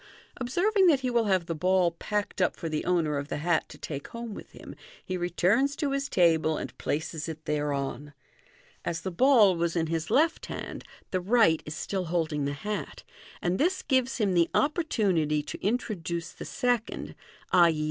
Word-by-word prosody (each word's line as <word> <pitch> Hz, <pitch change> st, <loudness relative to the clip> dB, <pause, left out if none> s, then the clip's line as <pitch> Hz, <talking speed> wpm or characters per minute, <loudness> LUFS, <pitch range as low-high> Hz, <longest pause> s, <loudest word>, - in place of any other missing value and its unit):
Observing 370 Hz, -, +2 dB
that 290 Hz, -6 st, +4 dB
he 255 Hz, -1 st, -1 dB
will 235 Hz, -2 st, +2 dB
have 190 Hz, -4 st, +2 dB
the 165 Hz, -, -2 dB
ball 180 Hz, +2 st, +2 dB
packed 205 Hz, +3 st, -3 dB
up 180 Hz, -, +2 dB
for 165 Hz, -, -5 dB
the 155 Hz, -1 st, -2 dB
owner 160 Hz, -5 st, +1 dB
of 140 Hz, -, -5 dB
the -, -, -3 dB
hat 165 Hz, +2 st, 0 dB
to -, -, -11 dB
take 140 Hz, -2 st, -6 dB
home 230 Hz, -2 st, -7 dB
with -, -, -10 dB
him, -, -, -11 dB, 0.3 s
he 185 Hz, -, -3 dB
returns 185 Hz, +10 st, +1 dB
to 285 Hz, -2 st, -1 dB
his 275 Hz, 0 st, -1 dB
table, 160 Hz, -3 st, +3 dB
and -, -, -6 dB
places 160 Hz, +1 st, -3 dB
it 155 Hz, -1 st, -8 dB
thereon. 145 Hz, -1 st, -2 dB, 0.7 s
As 170 Hz, -1 st, -3 dB
the 190 Hz, -, -4 dB
ball 220 Hz, -2 st, +5 dB
was 170 Hz, 0 st, -1 dB
in 165 Hz, -2 st, +1 dB
his 160 Hz, -1 st, -2 dB
left 310 Hz, +8 st, +2 dB
hand, -, -, -6 dB, 0.3 s
the 185 Hz, -, 0 dB
right 200 Hz, -5 st, +4 dB
is 150 Hz, -, -5 dB
still 190 Hz, +2 st, -3 dB
holding 160 Hz, -4 st, -1 dB
the 140 Hz, -, -1 dB
hat, 210 Hz, +9 st, -5 dB, 0.4 s
and 175 Hz, +2 st, 0 dB
this 360 Hz, +5 st, +1 dB
gives 260 Hz, -2 st, +1 dB
him 205 Hz, -5 st, +1 dB
the 170 Hz, -1 st, +3 dB
opportunity 195 Hz, -, +1 dB
to -, -, -6 dB
Fig. -, -, -9 dB
139. -, -, +5 dB, 0.3 s
introduce 170 Hz, 0 st, -4 dB
the -, -, -9 dB
second 245 Hz, -2 st, -1 dB, 0.4 s
(i.e. 170 Hz, -3 st, +5 dB
180 Hz, 190 wpm, -28 LUFS, 160-235 Hz, 0.7 s, ball